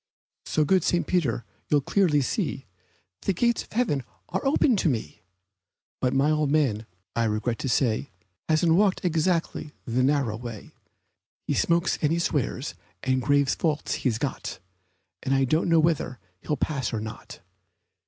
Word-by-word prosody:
So 155 - +2
good 185 +2 +3
St. 175 0 +1
Peter, 135 -11 0 0.2
you'll 145 -1 +4
clearly 160 -2 +2
see 140 - -2 0.6
The 195 - 0
gate 235 +5 +2
of - - -19
heaven 220 - +1
is 155 +8 -6
open 270 -2 +3
to 175 - +2
me; 110 - -3 0.8
But 125 0 0
my 140 +3 +3
old 155 -2 +1
man, 130 -8 +1 0.3
I 115 - +2
regret 110 +2 -1
to 135 - -2
say, 120 +1 +1 0.4
Hasn't 160 +1 +4
walked 190 +1 +2
exactly 165 -2 0
the 120 +2 0
narrow 130 -5 +1
way 115 -3 -8 0.7
He - - 0
smokes 170 +1 +2
and 150 - +2
he 165 - +2
swears, 140 - -1 0.3
and 130 0 +1
grave 140 +2 +3
faults 155 -3 0
he's 120 -5 +1
got, 135 -7 -4 0.6
And 135 0 +1
I 135 - +3
don't 155 +6 +1
know 165 -1 +5
whether 155 -5 +1 0.2
he - - -19
will 150 - 0
pass 135 -4 -1
or 110 - -2
not. 110 +1 -8
145 Hz, 165 wpm, -26 LUFS, 125-165 Hz, 0.8 s, know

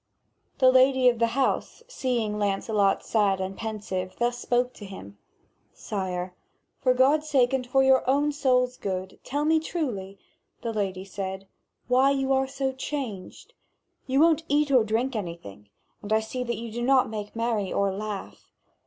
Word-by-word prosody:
The 255 -1 +6
lady 260 0 +5
of 240 -2 -2
the 230 - +3
house, 275 - 0
seeing 235 - -2
Lancelot 200 0 +1
sad 200 -4 +2
and 190 +1 -4
pensive, 205 -4 -4
thus 240 0 0
spoke 245 +1 0
to 205 - -10
him: 100 - -11 0.6
"Sire, 185 -3 -4 0.5
for 255 -2 +3
God's 295 +4 +3
sake 265 -3 +3
and 255 -2 -1
for 270 +2 +3
your 265 0 +5
own 290 +2 +2
soul's 255 -3 +1
good, 190 -1 -4
tell 290 +3 -2
me 320 +1 +4
truly," 235 - -4 0.5
the 230 -1 -2
lady 190 -3 -2
said, 195 0 -6 0.4
"why 255 +2 +4
you 270 -1 +1
are 265 0 +2
so 270 0 -2
changed. 260 - -6 0.5
You 265 +1 +2
won't 325 0 +4
eat 290 0 +2
or 255 -4 +5
drink 230 +4 -1
anything, 170 - -7 0.3
and 205 - -8
I 220 - +4
see 235 +3 -4
that 235 -2 -2
you 230 0 -6
do 240 +2 -4
not 260 +1 +4
make 210 -1 -6
merry 225 -4 -1
or 200 -1 +1
laugh. 205 0 -7
235 Hz, 165 wpm, -26 LUFS, 200-265 Hz, 0.6 s, The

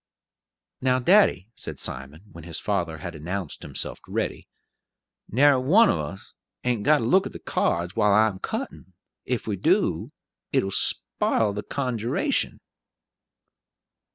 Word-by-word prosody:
"Now, 130 0 +2
daddy," 130 - +4
said - - -7
Simon, 70 +6 -7
when 85 -2 -11
his 85 -1 -4
father 85 -6 -2
had 85 +3 -7
announced 85 +2 -5
himself - - -4
ready, - - -3 0.8
"narry 135 +2 +4
one 200 - +5
of - - -1
us 75 +6 -7 0.3
ain't 125 -4 0
got 150 +8 +4
to 120 - -3
look 185 +12 +3
at - - -11
the - - -8
cards, 85 +1 -1
while 105 -2 +3
I'm 105 -1 +3
a - - -18
cuttin'; 95 - -6 0.3
if 125 -1 -2
we 105 -3 -2
do, - - +1 0.4
it'll 95 - +1
spile 105 +2 +3
the 105 - -4
conjuration." 130 - -1
105 Hz, 140 wpm, -25 LUFS, 90-130 Hz, 0.8 s, one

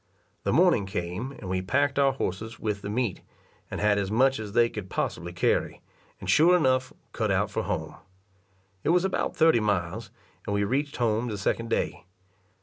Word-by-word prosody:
The - - +2
morning 100 - +4
came, 95 +7 -4
and 100 - -9
we 95 0 -1
packed 140 +8 +1
our 135 -1 +4
horses 110 -1 -4
with 105 -2 -2
the 100 - -5
meat, 110 -3 -1 0.5
and - - -5
had 105 -1 +3
as 95 -1 -2
much 130 +4 +3
as 105 -2 -6
they 120 0 +5
could 105 -5 -7
possibly 85 -1 -3
carry, 85 - 0 0.4
and - - -8
sure 165 - +5
enough 130 -4 +1 0.2
cut - - -1
out - - +1
for - - -1
home. - - -3 0.9
It - - 0
was 180 +2 +4
about 190 - -1
thirty 160 -7 +5
miles, 105 0 -1 0.4
and 100 - 0
we 100 - +1
reached 140 +7 -1
home 115 0 +1
the 105 -3 -3
second 115 +3 -1
day. - - -2
110 Hz, 185 wpm, -27 LUFS, 100-130 Hz, 0.9 s, they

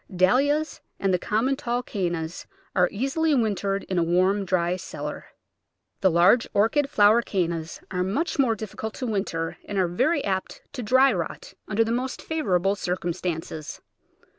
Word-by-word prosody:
Dahlias 275 - +2 0.2
and 195 -1 +1
the 180 - +2
common 230 +9 +1
tall 245 -3 -2
Canna 175 -7 -2 0.5
are 180 -1 +4
easily 280 +8 +1
win 225 -5 +2
tered 195 0 -2
in 185 -2 -1
a - - +3
warm, 185 +4 +2
dry 180 -1 +1
cellar. 185 - -6 0.7
The 190 - +4
large 180 +8 +4
Orchid 275 +8 +3
flow 205 -7 +5
ered 235 +1 +3
Cannas 170 -4 -2
are 180 -1 -1
much 280 - -1
more 245 -5 +3
difficult 220 +1 -6
to 260 - -4
winter, 195 -7 -2
and 205 - -4
are 185 -2 +3
very 270 - +1
apt 190 -2 -3
to 250 - -4
dry 260 +3 +4
rot 170 -4 -5
under 215 +4 +2
the 225 - -2
most 250 +2 -2
favourable 195 - 0
circum 175 -3 -2
stances. 160 -3 -5
200 Hz, 165 wpm, -25 LUFS, 180-250 Hz, 0.7 s, flow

